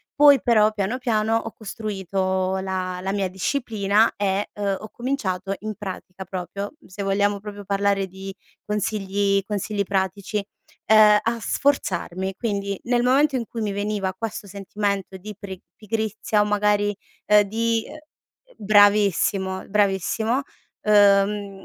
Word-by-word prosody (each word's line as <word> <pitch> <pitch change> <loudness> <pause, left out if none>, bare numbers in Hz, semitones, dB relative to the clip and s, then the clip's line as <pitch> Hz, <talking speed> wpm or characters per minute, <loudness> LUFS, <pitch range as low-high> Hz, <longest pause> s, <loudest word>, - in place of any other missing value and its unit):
poi 285 -1 +7
però 215 -3 +4
piano, 215 +4 -2
piano 225 -3 +1
ho 225 0 -2
costruito 190 -3 -2
la 185 -1 -3
la 190 +1 -2
mia 200 -1 0
disciplina 210 0 +1
e, 200 0 -1
uhm, 200 -1 -1
ho 215 - -9
cominciato 200 -7 -2
in 215 0 -4
pratica 190 -1 -7
proprio 190 - -5
se 185 +2 -8
vogliamo 200 +1 +1
proprio 205 0 -9
parlare 200 0 +1
di 190 +1 -8 0.3
consigli 200 -1 0
consigli 205 0 -2
pratici, 200 +1 -2 0.4
ehm, 215 -1 +7
a 230 +1 -1
sforzarmi. 195 -7 -1
Quindi, 200 -4 -2
nel 245 0 +1
momento 275 +3 +3
in 240 -2 -1
cui 230 - -6
mi 210 -2 -1
veniva 205 -1 -2
questo 215 +1 -5
sentimento 200 0 -3
di 210 +3 -9
pre 190 -3 -7 0.2
pigrizia 220 0 -1
o - - +2
magari, 205 0 +1 0.3
ehm, 210 0 +6
di 225 +2 0
uhm, - - -10
uhm, - - -10 0.6
bravissimo, 200 -2 +3
bravissimo, 210 +5 +1 0.4
uhm, 200 -1 +3
205 Hz, 135 wpm, -23 LUFS, 195-215 Hz, 0.6 s, poi